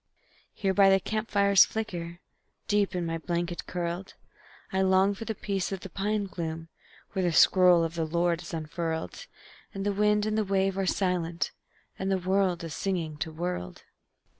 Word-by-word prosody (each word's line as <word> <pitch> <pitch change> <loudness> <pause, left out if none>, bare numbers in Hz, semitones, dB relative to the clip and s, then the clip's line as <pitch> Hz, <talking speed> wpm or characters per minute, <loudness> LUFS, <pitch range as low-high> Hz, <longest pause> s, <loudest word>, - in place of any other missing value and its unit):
Here 195 -2 0
by 195 0 +6
the 195 0 +5
camp 215 +3 -3
fire's 200 -1 +6
flicker, 175 -5 -5 0.5
Deep 205 -2 +1
in 175 -1 -1
my 165 0 -2
blanket 175 +1 -3
curled, 175 +1 -4 0.6
I 190 - +2
long 190 +1 +4
for 215 +3 -7
the 220 - -3
peace 195 -2 -2
of 190 -2 -4
the 195 - -9
pine 205 +2 -1
gloom, 165 -3 -5 0.4
When 190 - -1
the 175 - +2
scroll 180 0 +6
of 165 0 -2
the 165 -1 -1
Lord 170 +1 +1
is 170 - -9
unfurled, 165 - -4 0.5
And 195 0 -3
the 205 - +1
wind 210 +1 +2
and 215 0 0
the - - +2
wave 195 -1 +1
are 195 -1 -1
silent, 175 -3 0 0.5
And 190 - -1 0.2
world 185 -2 +1
is 165 -3 -5
singing 165 -5 -2
to 160 +1 -3
world. 160 - -4
185 Hz, 175 wpm, -28 LUFS, 170-195 Hz, 0.6 s, by